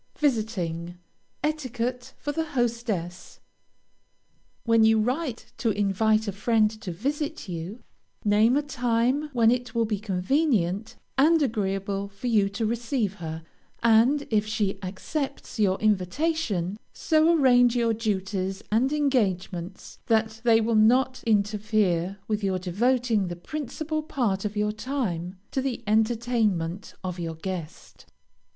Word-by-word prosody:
VISITING. 185 Hz, -, -1 dB, 0.5 s
ETIQUETTE 250 Hz, -5 st, -3 dB
FOR 290 Hz, -, -3 dB
THE 320 Hz, +2 st, -1 dB
HOSTESS. 225 Hz, -8 st, -2 dB, 1.2 s
When 230 Hz, -1 st, +4 dB
you 220 Hz, 0 st, +5 dB
write 250 Hz, +2 st, -2 dB
to 230 Hz, -, +1 dB
invite 215 Hz, +2 st, +2 dB
a -, -, 0 dB
friend 215 Hz, +2 st, +2 dB
to 185 Hz, -, -5 dB
visit 290 Hz, -, -3 dB
you, 180 Hz, +6 st, -6 dB, 0.4 s
name 215 Hz, +5 st, +4 dB
a 295 Hz, -, +1 dB
time 250 Hz, +1 st, 0 dB
when 230 Hz, -3 st, +4 dB
it 245 Hz, -1 st, -2 dB
will 230 Hz, -1 st, +2 dB
be 210 Hz, -2 st, -2 dB
convenient 210 Hz, -, 0 dB, 0.2 s
and 325 Hz, +4 st, +5 dB
agreeable 200 Hz, -4 st, -1 dB
for 200 Hz, +5 st, -11 dB
you 210 Hz, -5 st, +3 dB
to 200 Hz, +3 st, -2 dB
receive 230 Hz, -2 st, -1 dB
her, 160 Hz, 0 st, -5 dB, 0.4 s
and 235 Hz, +6 st, +4 dB
if 215 Hz, -1 st, +2 dB
she 210 Hz, -3 st, -1 dB
accepts 255 Hz, +8 st, -5 dB
your 195 Hz, -3 st, +2 dB
invitation, 210 Hz, -, 0 dB
so 315 Hz, +1 st, +3 dB
arrange 245 Hz, -3 st, +5 dB
your 230 Hz, -2 st, +2 dB
duties 195 Hz, -3 st, -2 dB
and 245 Hz, +6 st, +2 dB
engagements 195 Hz, -, -1 dB
that 220 Hz, -1 st, +1 dB
they 230 Hz, -2 st, +5 dB
will 230 Hz, +1 st, 0 dB
not 250 Hz, +4 st, +3 dB
interfere 205 Hz, -3 st, +1 dB
with 215 Hz, -1 st, -1 dB
your 190 Hz, -1 st, +1 dB
devoting 220 Hz, +3 st, +1 dB
the 175 Hz, -, -4 dB
principal 305 Hz, -, -4 dB
part 230 Hz, -10 st, -1 dB
of 210 Hz, 0 st, -3 dB
your 210 Hz, 0 st, +1 dB
time 210 Hz, -7 st, -3 dB
to 265 Hz, -, 0 dB
the 255 Hz, -3 st, -3 dB
entertainment 215 Hz, -5 st, 0 dB
of 180 Hz, -1 st, -4 dB
your 165 Hz, -1 st, -4 dB
guest. 175 Hz, 0 st, -7 dB
220 Hz, 130 wpm, -26 LUFS, 195-250 Hz, 1.2 s, you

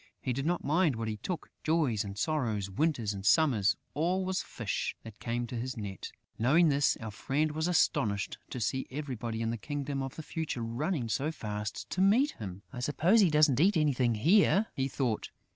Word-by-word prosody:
He 125 Hz, -, -2 dB
did 135 Hz, +4 st, -2 dB
not 175 Hz, 0 st, 0 dB
mind 155 Hz, -1 st, +2 dB
what 115 Hz, 0 st, -3 dB
he 110 Hz, -1 st, -3 dB
took: 165 Hz, -, -5 dB
joys 155 Hz, -10 st, +1 dB
and 100 Hz, -1 st, -7 dB
sorrows, 110 Hz, -8 st, -1 dB
winters 120 Hz, -3 st, 0 dB
and 95 Hz, -1 st, -6 dB
summers, 110 Hz, -, +3 dB, 0.2 s
all 180 Hz, +5 st, 0 dB
was 190 Hz, 0 st, -1 dB
fish -, -, -3 dB
that 110 Hz, -2 st, -11 dB
came 120 Hz, +1 st, -2 dB
to 120 Hz, -, -7 dB
his 125 Hz, +2 st, -4 dB
net!... 100 Hz, -3 st, -6 dB, 0.3 s
Knowing 155 Hz, +9 st, +5 dB
this, 140 Hz, 0 st, +2 dB
our 110 Hz, -1 st, -6 dB
friend 145 Hz, +8 st, -1 dB
was 160 Hz, +2 st, -1 dB
astonished 105 Hz, -, +1 dB
to 125 Hz, -, -5 dB
see 130 Hz, +4 st, -1 dB
everybody 125 Hz, -5 st, -4 dB
in 115 Hz, -, 0 dB
the 115 Hz, -, -3 dB
Kingdom 140 Hz, +4 st, -3 dB
of 135 Hz, -1 st, -5 dB
the 160 Hz, -, -7 dB
Future 155 Hz, -7 st, -3 dB
running 125 Hz, +4 st, -2 dB
so 135 Hz, +8 st, -1 dB
fast 105 Hz, -7 st, -5 dB
to 185 Hz, -, 0 dB
meet 235 Hz, +10 st, +4 dB
him: 95 Hz, -1 st, -8 dB
"I 125 Hz, -, -5 dB
suppose 165 Hz, -, +3 dB
he 190 Hz, -, +5 dB
doesn't 150 Hz, -4 st, +4 dB
eat 185 Hz, +3 st, +4 dB
anything 130 Hz, -6 st, +2 dB
here," 195 Hz, -, +4 dB
he 135 Hz, 0 st, -1 dB
thought. 125 Hz, -5 st, -2 dB
135 Hz, 195 wpm, -30 LUFS, 115-160 Hz, 0.3 s, Knowing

